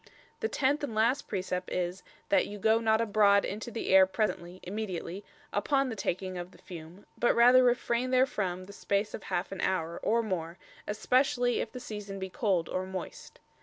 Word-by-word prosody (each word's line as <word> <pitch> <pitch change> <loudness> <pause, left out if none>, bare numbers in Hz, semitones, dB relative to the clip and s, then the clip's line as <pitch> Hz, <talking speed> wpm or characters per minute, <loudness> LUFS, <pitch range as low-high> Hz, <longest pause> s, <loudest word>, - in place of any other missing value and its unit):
The 445 - 0
tenth 285 -2 +1
and 245 -7 -3
last 235 +6 +2
precept 185 -2 -3
is 180 +1 -2 0.3
"that 295 - +3
you 205 - -7
goe 220 +3 +3
not 220 -1 +2
abroad 205 -2 +4
into 215 +4 -5
the 230 -1 -4
aire 190 0 +7
presently 185 -3 -2
[immediately] 190 -1 -4 0.3
upon 270 +6 +1
the 225 - -4
taking 185 -2 -3
of 175 0 -6
the - - -18
fume, 170 +2 -11
but 240 - +3
rather 250 +2 +7
refrain 245 0 +1
therefrom 210 -9 +1
the 200 - -11
space 200 +1 -1
of - - -5
halfe 175 +2 -2
an 195 - -6
houre, 170 -3 -1
or 230 +1 +2
more, 175 -5 -3 0.3
especially 245 +3 +2
if 220 - -5
the 250 - -7
season 210 -4 -7
be 190 -1 -5
cold, 190 - 0
or 185 0 -3
moist." 190 -1 -7
205 Hz, 185 wpm, -30 LUFS, 185-235 Hz, 0.3 s, aire